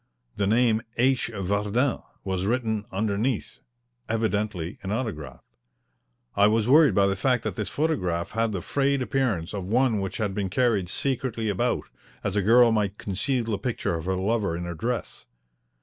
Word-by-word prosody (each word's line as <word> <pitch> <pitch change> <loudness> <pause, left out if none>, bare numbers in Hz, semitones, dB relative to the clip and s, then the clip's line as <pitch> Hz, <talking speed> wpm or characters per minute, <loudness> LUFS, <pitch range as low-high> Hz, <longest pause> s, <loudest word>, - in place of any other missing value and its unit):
The 100 - 0
name 115 0 +3 0.2
"H. 130 0 +2
Vardin" 105 +6 0 0.2
was 95 -1 -2
written 110 -3 0
underneath 105 +4 -1 0.5
evidently 105 -5 -1
an 95 - -4
autograph. 100 - -4 0.9
I 100 +1 +5
was 110 +1 +2
worried 150 +2 +6
by 100 - +5
the 100 0 +1
fact 125 +4 +1
that 110 -5 -3
this 105 -4 -3
photograph 90 - -1
had 115 0 0
the 95 -5 -4
frayed 140 -1 +1
appearance 120 - -1
of 100 -2 -3
one 115 +3 +2
which 95 0 -4
has 105 -3 -1
been 95 -1 -2
carried 105 -5 +1
secretly 130 -4 -1
about, 100 - 0 0.4
as 100 -1 -2
a 105 - +3
girl 115 +4 +6
might 105 -2 0
conceal 120 +6 -1
the 110 -3 -2
picture 125 -8 -2
of 80 -1 -4
her 95 0 0
lover 100 -2 0
in 85 - -4
her 85 0 -4
dress. 120 +9 -4
105 Hz, 165 wpm, -26 LUFS, 95-120 Hz, 0.9 s, worried